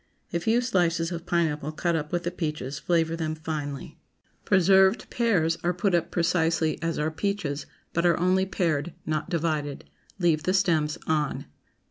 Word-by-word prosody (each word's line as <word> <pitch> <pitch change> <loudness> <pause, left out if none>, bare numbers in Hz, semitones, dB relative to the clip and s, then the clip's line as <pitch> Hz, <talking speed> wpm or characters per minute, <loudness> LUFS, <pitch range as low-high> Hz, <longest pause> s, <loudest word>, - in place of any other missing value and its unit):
A 170 - +1
few 225 +7 +2
slices 175 -7 +1
of 170 0 -6
pineapple 155 -3 0
cut 170 +2 0
up 150 -2 -3
with 175 0 -1
the 175 - -2
peaches 150 -5 -4
flavor 165 -1 +1
them 160 -1 -2
finely. 150 -3 -5 0.5
PRESERVED 190 +3 +4
PEARS 170 -9 +1
Are 175 0 +1
put 185 +2 +1
up 170 - +1
precisely 165 -2 +1
as 165 0 -1
are 155 +1 0
peaches, 155 -5 -2 0.3
but 170 - +1
are 170 - +3
only 185 +2 +2
pared, 170 -4 -1
not 155 +2 -2
divided. 155 -4 -2 0.3
Leave 170 -4 +2
the 185 +4 +1
stems 160 -6 +2
on. 150 -2 0
165 Hz, 160 wpm, -26 LUFS, 155-180 Hz, 0.5 s, PRESERVED